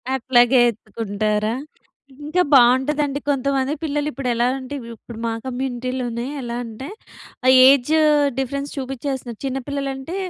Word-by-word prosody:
అట్లాగే 245 0 +4
ఎత్తుకుంటారా? 215 -1 -2 0.7
ఇంకా 330 +5 +1
బాగుంటదండి. 275 +3 +4
కొంతమంది 275 0 0
పిల్లలు 295 -1 -1
ఇప్పుడు 275 -3 -4
ఎలా 235 +1 +1
అంటే, 260 +2 -7 0.2
ఇప్పుడు 225 +1 -11
మా 230 - 0
కమ్యూనిటీ‌లోనే 250 -2 -3 0.2
ఎలా 240 -1 -4
అంటే, 230 +3 -8 0.6
ఆహ్, 260 - +7
ఏజ్ 275 +1 +4 0.5
డిఫరెన్స్ 280 +2 -3
చూపించేస్తున్నారు. 265 -3 -5
చిన్న 270 0 -2
పిల్లలంటే 275 +3 -4
260 Hz, 115 wpm, -21 LUFS, 240-275 Hz, 0.7 s, ఆహ్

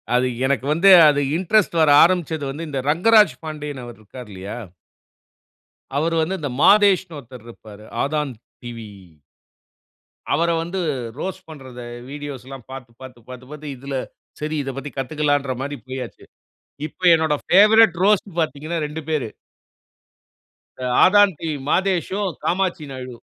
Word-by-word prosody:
அது 125 +1 +2 0.2
எனக்கு 135 -1 0
வந்து, 180 +5 +4 0.2
அது 145 -1 +1 0.2
இன்ட்ரெஸ்ட் 190 +1 +1
வர 155 - +4
ஆரம்பிச்சது 165 -3 0
வந்து, 155 +4 -6
இந்த 140 -2 -3
ரங்கராஜ் 210 +6 +5
பாண்டியன் 150 -3 -6
அவர் 120 -1 -10
இருக்கார் 120 +2 -12
இல்லையா? 95 +3 -7 1.4
அவர் 165 +3 0
வந்து 185 +4 -2
இந்த 145 -3 -4
மாதேஷ்னு 190 -5 +4
ஒருத்தர் 125 -3 -13
இருப்பாரு. 105 -2 -13 0.2
ஆதான் 150 -1 -2 0.3
டிவி. 115 -3 -8 1.4
அவர 165 +4 +1
வந்து 175 +3 -4 0.4
ரோஸ்ட் 190 0 -5
பண்றத 130 -5 -11 0.3
வீடியோஸ்லாம் 135 -3 -8
பார்த்து, 130 -3 -9
பார்த்து, 130 -2 -11
பார்த்து, 130 0 -10
பார்த்து 150 -2 -7
இதில 135 +2 -6 0.5
சரி 155 +1 -3
இத 135 - -4
பத்தி 135 +1 -6
கத்துக்கலாங்கிற 145 0 -1
மாரி 145 +1 -4
போய்யாச்சு. 130 -2 -7 0.6
இப்ப 155 - -16
என்னுடைய 160 -2 +1
பேவரைட் 210 +1 +6
ரோஸ்ட் 205 0 +2
பார்த்தீங்கனா 155 +1 -2
2 150 +2 -6
பேரு. 150 -7 -1 1.5
இந்த 130 0 -4 0.2
ஆதான் 205 0 +5
டிவி 160 -2 -3
மாதேஷும், 190 +2 0
காமாட்சி 180 -3 -1
நாயுடும். 125 -2 -9
150 Hz, 130 wpm, -21 LUFS, 130-175 Hz, 1.5 s, பேவரைட்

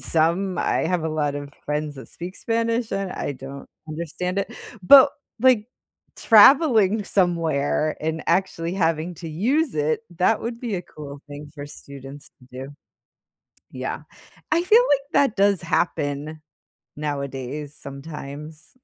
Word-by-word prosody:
some 170 +4 +1
I - - +1
have 175 -1 0
a - - 0
lot 150 -2 -1
of 145 0 -6
friends 150 -1 -3
that 130 - -10
speak 180 +3 -8
Spanish, 230 0 -1
and 195 -1 -2
I - - -3
don't 135 +1 -10 0.2
understand 170 +4 -3
it, 200 +4 -3 0.3
but, 275 +8 +9 0.3
like, 245 -5 +4 0.5
traveling 220 - +6
somewhere 160 -5 +1
and 160 +1 -2
actually 175 -3 0
having 165 -1 0
to 165 0 -8
use 250 - 0
it, 150 +1 0 0.2
that 185 +6 +2
would 230 0 -5
be 235 -5 -3
a 175 - -4
cool 145 -4 -10
thing 145 0 -9
for 145 -1 -7
students 140 -1 -11
to 125 - -18
do. 130 +2 -7 1.0
Yeah, - - -4 0.5
I 325 +2 +3
feel 440 +6 +6
like 280 -1 +4
that 275 -6 +3
does 200 -1 +3
happen 155 -3 -1 0.6
nowadays, 140 0 -4
sometimes. 150 +2 -9
165 Hz, 140 wpm, -23 LUFS, 145-200 Hz, 1.0 s, but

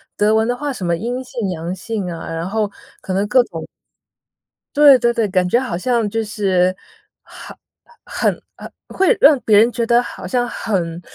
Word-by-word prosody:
德 210 +1 +2
文 220 0 +2
的 245 - 0
话 290 +1 -4
什 195 -8 -6
么 170 - +1
阴 245 +8 -4
性 235 -5 -4
阳 170 +1 -4
性 210 -4 -4
啊， 165 - -7
然 165 +3 -4
后 210 -1 -1 0.3
可 190 - -7
能 200 +2 0
各 250 +3 +4
种 - - -8 1.1
对 290 -2 +7
对 235 0 +2
对， 225 -3 0
感 185 -1 +1
觉 235 +7 +2
好 245 -10 -3
像 235 +1 0
就 225 +1 -2
是 190 -4 0 0.5
很 - - -12 0.5
很， - - 0 0.2
呃 - - -9 0.2
会 385 +6 +2
让 285 -2 +6
别 210 -2 +3
人 230 +3 +5
觉 235 -1 -2
得 235 +1 +3
好 - - -8
像 245 -1 0
很 175 -7 -3
220 Hz, 205 characters per minute, -18 LUFS, 185-245 Hz, 1.1 s, 对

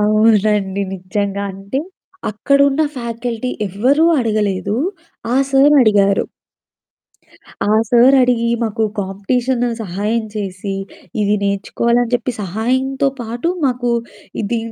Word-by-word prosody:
అవునండి. 210 -2 +2
నిజంగా, 200 +2 -3
అంటే 195 +7 -4 0.5
అక్కడున్న 280 +6 +2
ఫ్యాకల్టీ 235 0 -4 0.2
ఎవ్వరూ 255 - +2
అడగలేదు, 210 -3 0 0.6
ఆ - - +3
సారు 275 +2 +5
అడిగారు. 200 -3 +3 1.4
ఆ 210 - +2 0.2
సారు 245 +3 +6
అడిగి 240 -2 +2
మాకు 220 0 -1 0.2
కాంపిటీషను 235 +6 -1
సహాయం 210 +4 -2
చేసి 195 -1 -4 0.5
ఇది 205 0 +2
నేర్చుకోవాలని 200 +4 0
అని 240 - -8
చెప్పి 245 +1 -1
సహాయంతో 255 +8 0
పాటు 235 +7 -3 0.2
మాకు 245 -2 0 0.5
ఇది 230 +3 -1
225 Hz, 100 wpm, -17 LUFS, 200-250 Hz, 1.4 s, సారు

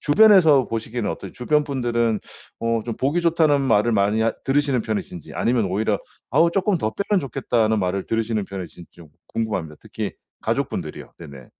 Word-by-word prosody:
주변에서 160 - +6
보시기에는 115 0 -3
어떠세요? - - -7
주변 150 +4 +1
분들은 120 -5 0 0.4
어 115 -1 0
좀 115 -2 -4
보기 145 +7 0
좋다는 160 -4 +3
말을 115 -2 +3
많이 105 +1 +2
하 110 0 +2
들으시는 135 -3 +1
편이신지 105 -7 -5
아니면 115 -4 +1
오히려 100 +2 0 0.3
어우 170 +1 +4
쪼끔 195 +1 +1
더 110 -4 -1
빼면 200 -1 +1
좋겠다는 120 -6 0
말을 95 0 -1
들으시는 115 -2 -1
편이신지 90 -3 -8
좀 85 -2 -15 0.2
궁금합니다. 95 -9 -3
특히 - - -5 0.3
가족분들이요. - - -3
네네. 70 -6 -11
115 Hz, 420 characters per minute, -22 LUFS, 105-140 Hz, 0.4 s, 주변에서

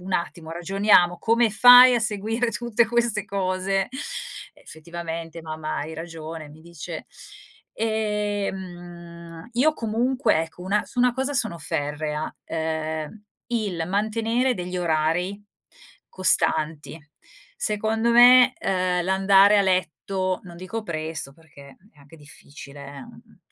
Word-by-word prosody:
un 185 +1 -7
attimo, 170 -2 -3
ragioniamo, 175 0 +2
come 230 +4 +2
fai 245 +3 +8
a 240 - +1
seguire 220 +3 -1
tutte 235 0 +1
queste 235 -3 0
cose?" 195 0 -1 0.6
"Effettivamente 165 0 -8
mamma 155 -1 -5
hai 155 +2 -5
ragione." 160 -1 -8
Mi 155 +2 -15
dice. 170 -2 -9 0.7
Ehm, 190 -6 -4
io 280 +6 +3
comunque 235 - 0
ecco 165 +2 -10
una 200 +3 0
su 250 - -10
una 250 0 +4
cosa 265 +2 -2
sono 220 -8 +1
ferrea, 150 0 -3 0.2
ehm, 160 +4 -4 0.3
il 200 -8 -2
mantenere 225 +5 0
degli 180 -2 -5
orari 175 +4 -1 0.7
costanti. 160 -4 0 0.6
Secondo 220 +2 0
me, 250 +1 +7
uhm, 185 -2 0
l'andare 195 +2 +5
a - - +4
letto 185 0 -1
non 175 -2 -12
dico 185 +6 -6
presto 160 -6 -4
perché 140 -3 -17 0.2
è 150 - -26
anche 140 +3 -17
difficile, 140 -1 -12
eh, 140 0 -10
mhmm, - - -17
185 Hz, 120 wpm, -23 LUFS, 160-220 Hz, 0.7 s, fai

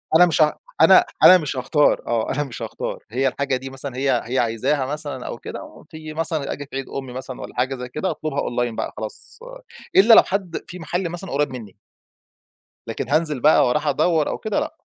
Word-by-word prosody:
أنا 175 +2 +8
مش 165 -2 +1
ها 150 - +3 0.2
أنا، - - +7 0.2
أنا 185 - +10
مش 150 -5 -4
هاختار 135 +4 +2
آه، 115 -2 0
أنا 145 +2 -1
مش 135 -5 -9
هاختار - - -5
هي 130 +3 +1
الحاجة 135 +1 -1
دي 130 +1 -6
مثلًا 135 0 -7
هي 135 -2 +1
هي 130 +2 -1
عايزاها 125 +5 0
مثلًا 145 -2 -5
أو - - -5
كده، - - -9
في 155 -1 -9
مثلًا 160 -2 -2
أجي 145 - -7
في 135 - -11
عيد 135 0 -3
أم 135 - -5
مثلًا 130 0 -7
والّا - - -9
حاجة 130 +2 0
زي 125 -1 -7
كده 160 +8 -2
أطلبها 155 -2 -4
أونلاين 120 -1 -2
بقى - - -4
خلاص - - -7 0.6
إلّا 215 +5 +7
لو - - +9
حد 190 -3 -3
في 180 - -9
محل 175 +1 -2
مثلًا 175 +2 -7
قريّب 145 +2 +1
مِنّي. 110 -6 -9 1.1
لكن - - -4
هانزل 155 -2 +1
بقى 150 -1 +5
وأروح 150 +5 0
أدوّر 160 0 +2
أو - - -3
كده، 215 -2 -1
لأ. - - -5
140 Hz, 210 wpm, -22 LUFS, 130-160 Hz, 1.1 s, أنا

